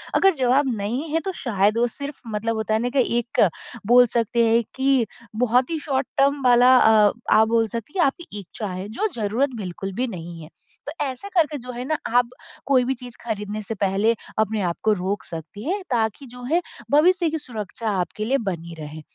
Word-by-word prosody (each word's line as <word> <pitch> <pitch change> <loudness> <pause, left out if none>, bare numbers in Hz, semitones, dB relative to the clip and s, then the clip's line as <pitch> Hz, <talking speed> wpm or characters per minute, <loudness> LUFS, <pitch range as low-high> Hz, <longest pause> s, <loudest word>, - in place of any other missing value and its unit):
अगर 390 -1 +5
जवाब 265 +2 +2
नहीं 235 +10 -2
है 325 +2 +1
तो 385 - -1
शायद 210 -2 +1
वो 240 - +3
सिर्फ़ 280 +4 -7
मतलब 225 +1 -2
होता 220 0 -1
है 220 - +2
ना 245 - 0
कि 265 - +5 0.2
एक 235 -1 0 0.5
बोल 245 +1 +7
सकते 235 +1 +1
हैं 230 +1 +3
कि 265 -3 +2 0.4
बहुत 250 +3 +3
ही 325 - 0
शॉर्ट 270 -3 -1
टर्म 280 +1 +3
वाला 250 +1 +6
अ 215 -3 +6 0.2
आप 220 0 +6
बोल 225 -1 +2
सकती 230 +6 -6
हैं 345 - +4
आपकी 275 - -3
इच्छा 200 +2 -6
है 185 +2 -5
जो 435 - +1
ज़रूरत 230 +5 0
बिल्कुल 195 0 -5
भी 255 +5 -1
नहीं 170 -4 -7
है। 155 - -11 0.4
तो - - -3
ऐसे 265 +10 -6
करके 305 -3 +2
जो 250 0 -8
है 245 +1 -5
ना 310 +2 0 0.2
आप 245 -1 +3 0.4
कोई 260 -2 +4
भी 265 - 0
चीज़ 245 -1 -9
ख़रीदने 210 -1 -3
से 225 +2 -5
पहले 200 +3 +1 0.2
अपने 220 -1 +1
आप 175 -2 -1
को 220 - +4
रोक 195 +1 -2
सकती 165 +5 -8
हैं 400 +1 -1
ताकि 225 +3 0
जो 250 +1 -11
है 330 +8 +1 0.3
भविष्य 340 +3 +4
की 320 - -1
सुरक्षा 215 -5 -3
के 215 - -2
लिए 270 +4 +2
बनी 170 -1 -6
रहे। 155 +1 -8
235 Hz, 205 wpm, -23 LUFS, 205-270 Hz, 0.5 s, बोल